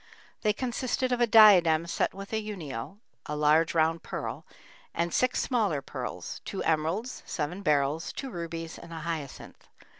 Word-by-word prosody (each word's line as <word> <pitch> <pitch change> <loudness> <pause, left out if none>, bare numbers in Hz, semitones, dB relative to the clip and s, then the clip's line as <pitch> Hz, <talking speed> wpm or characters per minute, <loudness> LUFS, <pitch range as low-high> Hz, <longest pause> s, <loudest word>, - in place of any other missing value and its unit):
They 215 - +3
consisted 255 +2 -1
of 245 -1 +1
a 240 - +5
diadem 180 -8 +7
set 170 - 0
with 195 +2 -9
a 220 - +1
"unio" 180 - -6 0.3
(a 150 - -3
large 155 +3 +3
round 165 +1 +2
pearl) - - -5 0.5
and 170 +1 -1
six 255 0 +2
smaller 205 - 0
pearls, 125 -11 -6
two 195 - -4
emeralds, 165 +10 -1
seven 165 +5 -3
beryls, 150 -1 +1
two 270 -2 -6
rubies, 165 -2 -6
and 170 - -12
a 165 -1 -6
hyacinth. 160 -4 -6
170 Hz, 155 wpm, -28 LUFS, 155-215 Hz, 0.5 s, diadem